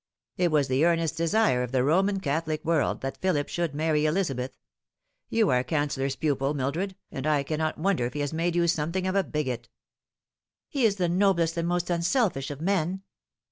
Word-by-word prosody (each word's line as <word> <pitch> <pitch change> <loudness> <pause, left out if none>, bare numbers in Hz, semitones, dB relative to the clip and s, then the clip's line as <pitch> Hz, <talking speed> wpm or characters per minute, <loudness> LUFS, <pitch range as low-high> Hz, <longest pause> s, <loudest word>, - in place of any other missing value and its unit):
It 180 -1 +2
was 150 -3 +2
the 130 +3 +2
earnest 165 -2 +2
desire 165 - +2
of 125 -1 -3
the 130 -1 +2
Roman 195 +7 +2
Catholic 155 -1 -2
world 160 -3 +1
that 135 0 -4
Philip 160 -6 +1
should 170 -4 -2
marry 155 0 +1
Elizabeth. 140 -7 -1 0.7
You 225 -3 +2
are 125 0 +3
Cancellor's 140 -2 -1
pupil, 140 -1 0
Mildred, 160 +9 -2 0.2
and 135 +3 -4
I 150 -2 +2
cannot 155 +2 -2
wonder 165 -7 +1
if 125 - -9
he 145 - -3
has 145 +1 -2
made 170 +2 0
you 170 0 +3
something 170 +3 0
of 185 - 0
a 195 0 +2
bigot." 130 -8 -3 0.5
" - - -67
He 270 -5 +1
is 205 -3 +3
the 180 -3 0
noblest 170 -2 +2
and 170 0 -1
most 175 0 -1
unselfish 175 - +1
of 145 0 -7
men." 190 +1 0
160 Hz, 190 wpm, -27 LUFS, 140-180 Hz, 0.7 s, are